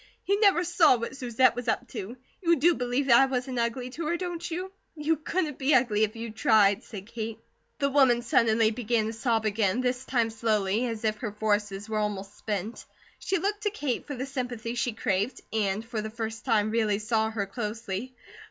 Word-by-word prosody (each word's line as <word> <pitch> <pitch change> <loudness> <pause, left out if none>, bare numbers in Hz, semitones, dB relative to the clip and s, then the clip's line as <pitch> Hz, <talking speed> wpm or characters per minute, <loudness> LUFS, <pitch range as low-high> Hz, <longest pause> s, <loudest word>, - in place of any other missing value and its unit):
He 400 - +2
never 400 -4 +4
saw 340 -6 +5
what 235 +3 -5
Susette 255 -1 +2
was 245 0 -5
up 245 +2 0
to. 220 +2 -6 0.2
You 340 -2 +4
do 335 +4 +4
believe 250 0 -1
that 235 -3 +7
I 270 - +5
wasn't 255 -1 -2
ugly 245 +2 -2
to 315 +4 -4
her, 340 +2 0
don't 345 -1 -4
you?" 365 +3 -4 0.2
"You 310 +1 +1
COULDN'T 315 -1 -2
be 275 +1 +3
ugly 230 -4 +3
if 215 +1 -1
you 230 0 -5
tried," 215 -1 +3
said 200 -4 -9
Kate. 225 0 -5 0.4
The 280 -1 0
woman 260 -4 +4
suddenly 225 -2 +3
began 230 -1 0
to 220 - -3
sob 225 -1 0
again, 215 +1 +1
this 250 0 -1
time 235 -3 0
slowly, 220 0 0
as 225 -2 -5
if 215 0 +1
her 215 -2 -4
forces 205 -1 -1
were 215 -1 -1
almost 205 -1 -3
spent. 210 +1 -4 0.4
She 390 - 0
looked 410 +4 -1
to 420 - +1
Kate 295 - -3
for 285 - -4
the 255 +1 -3
sympathy 245 -4 -4
she 240 0 -1
craved 205 +4 -1
and 210 0 0
for 230 -2 -3
the 220 - -5
first 225 +1 -5
time 215 -4 +2
really 220 -3 +1
saw 220 +1 0
her 215 -3 -2
closely. 215 +2 -5
235 Hz, 205 wpm, -27 LUFS, 215-265 Hz, 0.4 s, that